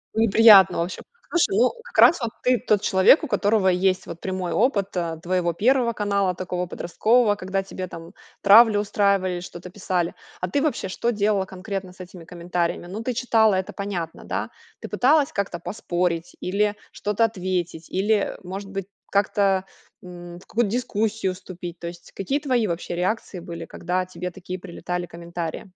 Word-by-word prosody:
Неприятно 220 -3 +7
вообще. 175 +2 -3 0.3
Послушай, 375 +4 +2
ну, - - +4
как - - -11
раз 340 - +7
вот 230 - -1
ты 250 -1 +3
тот 210 -2 +1
человек, 190 - +5
у - - -2
которого 205 -4 +2
есть 185 +1 +1
вот 170 - -9
прямой 185 -2 -3
опыт, 200 0 +1
а, 165 -2 -2
твоего 175 0 -1
первого 240 +4 +2
канала, 200 -3 0
такого 180 -1 -3
подросткового, 215 +6 +2
когда 195 0 -2
тебе 185 -1 -6
там 165 +2 -10 0.3
травлю 210 +1 +7
устраивали 200 -3 +1
или 175 - -3
что-то 175 0 -9
писали. 180 -3 -1 0.3
А 180 - -1
ты 280 - +1
вообще 300 -10 -1
что 235 +5 -1
делала 205 -2 +1
конкретно 190 0 -6
с 185 - -23
этими 180 -1 -10
комментариями? 175 0 -3
Ну, 200 +5 -6
ты 250 +2 -2
читала, 220 -4 +3
это 185 0 -3
понятно, 185 -5 -5
да. - - -3 0.3
Ты - - -7
пыталась 290 +3 +3
как-то 200 - -2
поспорить 175 -2 -2
или 205 +3 0 0.2
что-то 210 +2 0
ответить, 180 -5 -3
или, 200 +4 +1 0.2
э, - - -12
может 195 +2 -7
быть, 195 -2 -4 0.3
как-то, 195 -1 +2 0.4
м, 175 -1 -10
в - - -19
какую-то 230 -3 0
дискуссию 220 -4 -1
вступить? 175 -2 -9
То 170 - -6
есть 170 0 -10
какие 270 +10 -2
твои 250 -7 +1
вообще 170 0 -4
реакции 185 +1 -2
были, 170 -1 -7
когда 180 +3 -2
тебе 180 0 -6
такие 185 0 -7
прилетали 175 0 -5
комментарии? 170 +2 -6
190 Hz, 170 wpm, -23 LUFS, 180-210 Hz, 0.4 s, Неприятно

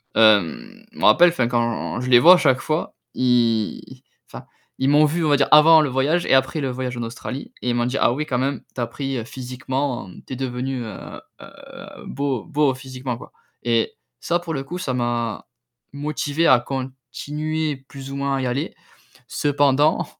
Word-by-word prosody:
hem, 110 - +2
je - - -14
me - - -6
rappelle, 175 0 +7
enfin, 130 -8 0
quand 120 0 -1
je 125 - -4
les 120 - +7
vois 175 +9 +9
à - - +2
chaque 130 -6 +2
fois, 155 +4 -2 0.2
ils, 120 -4 0 0.3
enfin, - - -10 0.3
ils 130 - 0
m'ont 150 +1 +5
vu, 160 +2 0
on 150 - +2
va 145 - +4
dire, 140 - +2
avant 155 +1 +8
le 145 - 0
voyage 145 +7 +1
et - - +3
après 135 +4 +1
le 135 - -1
voyage 125 0 -4
en 120 - -4
Australie 125 +3 -7
et 125 - -1
ils - - -1
m'ont 120 0 +1
dit: 130 - -2
«Ah 120 - +3
oui, 150 +4 -3
quand 125 -4 -1
même, 135 0 -1
tu 125 - -3
as - - +1
pris 125 -1 -4
physiquement, 130 -2 -4 0.2
tu - - -6
es - - -3
devenu, 130 0 -3
heu 110 -4 -9 0.2
heu, - - -11 0.6
beau 140 -2 -3
beau 150 -4 +1
physiquement, 130 -2 -6
quoi». - - -13 0.3
Et 115 -1 +1 0.3
ça, 175 - 0
pour 170 -2 -6
le 135 -2 -3
coup, 175 +6 -6
ça 145 -8 -3
m'a 120 -2 -2 0.5
motivé 145 +2 -2
à 125 -2 +6
continuer 140 +4 -4
plus 135 0 -9
ou 140 - -5
moins 140 0 -1
à - - -2
y 130 - -2
aller. 135 +6 -3 0.6
Cependant 145 +1 +2
135 Hz, 200 wpm, -22 LUFS, 125-150 Hz, 0.6 s, vois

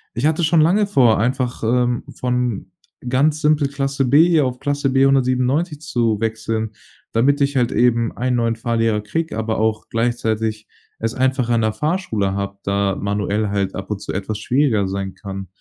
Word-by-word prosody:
ich 120 +4 -1
hatte 160 +2 0
schon 160 +1 +3
lange 200 +6 +3
vor, 125 - +4
einfach, 125 +2 -1
ähm, 120 +1 +1
von 125 -3 -2 0.4
ganz 145 +4 +2
simpel 150 -1 +3
Klasse 135 -1 -1
B 145 +7 +5
hier 160 -5 +3
auf 125 -1 -3
Klasse 145 -1 -1
B 135 +1 +4
197 135 +4 +1
zu 115 - 0
wechseln, 110 -1 -2 0.4
damit 140 +5 +2
ich 140 0 +1
halt 120 -2 +2
eben 120 -1 +2
einen 125 +1 0
neuen 115 -1 +1
Fahrlehrer 115 -2 0
kriege, 160 +6 -3
aber 110 0 -2
auch 110 -1 0
gleichzeitig 110 -2 -1 0.3
es 115 +1 -2
einfacher 130 -2 +1
an 115 - +2
der 110 -1 0
Fahrschule 150 - -1
habe, 100 0 -4
da 100 0 0
manuell 105 +1 -1
halt 100 -1 -1
ab 95 +1 -6
und 105 - -2
zu - - -5
etwas 100 +2 -3
schwieriger 120 -4 +1
sein 95 0 -4
kann. 95 0 -7
120 Hz, 175 wpm, -20 LUFS, 110-135 Hz, 0.4 s, B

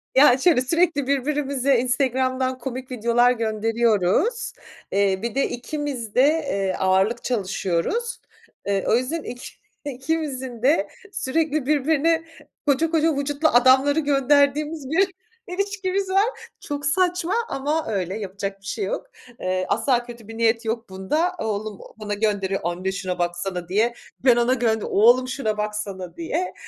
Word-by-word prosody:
Yani 265 -1 +6
şöyle, 335 -8 +4
sürekli 305 0 +1
birbirimize 280 -2 +1
Instagram'dan 255 0 0
komik 255 +1 -6
videolar 240 +1 +3
gönderiyoruz. 225 - +1 0.4
Eee, 195 -1 +2
bir 235 0 -3
de, 275 - +1
ikimiz 250 -3 -5
de, 250 - +6
eee, 240 -12 0
ağırlık 190 +5 +2
çalışıyoruz. 210 - -1 0.5
Iıı, 195 -2 +1
o - - +4
yüzden 270 +7 -1
iki 245 +1 -7 0.4
ikimizin 265 -3 -3
de 260 -7 +3 0.2
sürekli, 310 -1 -1
birbirine 315 +3 +2 0.4
koca 295 +3 +2
koca 320 -1 +2
vücutlu 285 +2 0
adamları 265 +3 +5
gönderdiğimiz 285 +1 +2
bir 380 +5 +2 0.4
ilişkimiz 390 0 -2
var. 400 +6 0
Çok 290 -1 -5
saçma 360 +3 +1 0.2
ama 295 +4 -1
öyle, 190 0 -2
yapacak 195 0 -5
bir - - -19
şey 405 - -2
yok. - - -4 0.3
Iıı, 185 0 -1
asla 240 +2 +1
kötü 235 -3 -11
bir 225 0 -9
niyet 230 0 +2
yok 225 0 -3
bunda. 300 - -1
Oğlum 215 -1 -3 0.2
bana 210 -1 -4
gönderiyor 205 -2 0
Anne 175 +3 -2
şuna 185 -2 -4
baksana. 175 0 -3
diye. 220 +5 +2 0.3
Ben 250 -2 +7
ona 240 +1 +3
gönderiyor 225 -4 0
"Oğlum 240 +5 +5
şuna 230 -5 -2
baksana." 210 -4 -4
diye. 335 +2 -2
255 Hz, 135 wpm, -23 LUFS, 210-295 Hz, 0.5 s, Ben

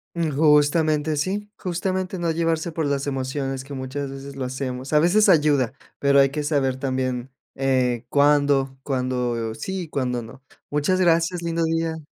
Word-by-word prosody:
Justamente 155 -1 +2
sí, 205 +6 -2
justamente, 185 0 -2
no 170 -1 0
llevarse 165 0 0
por 160 -1 -2
las 140 0 -1
emociones, 135 0 -3
que 140 +1 -10
muchas 135 +1 -4
veces 135 0 -8
lo 130 -2 -3
hacemos. 130 +1 -4
A 150 - +6
veces 195 +7 +4
ayuda, 145 - +3 0.2
pero 140 0 +4
hay 135 0 +5
que 150 +1 -3
saber 140 -3 +1
también, 130 -1 -2 0.2
eh, 130 -3 +1
cuándo, 140 -2 +3
cuándo 125 -4 -2
sí 190 -1 -4
y 170 - -6
cuándo 125 -4 -1
no. 120 +4 -12 0.3
Muchas 150 +6 +1
gracias, 170 0 +2
lindo 170 0 -1
día. 165 -1 -1
145 Hz, 160 wpm, -23 LUFS, 130-165 Hz, 0.3 s, A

